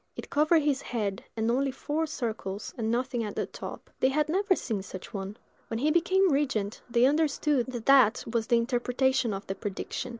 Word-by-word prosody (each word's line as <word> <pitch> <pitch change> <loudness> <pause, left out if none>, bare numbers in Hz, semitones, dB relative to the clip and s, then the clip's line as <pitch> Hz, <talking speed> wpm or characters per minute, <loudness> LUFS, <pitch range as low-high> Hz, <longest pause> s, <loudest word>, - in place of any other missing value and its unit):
It - - -8
covered 310 +2 +4
his 285 -2 +1
head, 205 -5 -3
had 220 0 0
only 270 +3 +1
four 300 +4 -2
circles, 220 -8 -4
and 225 -2 -2
nothing 245 0 0
at 210 -2 -5
the - - -1
top. - - -9
They 260 - +4
had 300 +2 +1
never 385 +3 +2
seen 220 - -3
such 185 +2 -9
a - - -22
one. 200 0 -5 0.3
When 225 - -3
he 295 +6 +2
became 370 +3 +3
regent, 260 -8 0
they 235 +1 +4
understood 290 -2 +2
that 240 -3 -6
that 265 -6 +5
was 230 -1 -1
the 240 - +4
interpretation 250 +1 +1
of 195 0 -5
the 195 - -3
prediction. 205 +4 -5
250 Hz, 200 wpm, -28 LUFS, 220-290 Hz, 0.3 s, that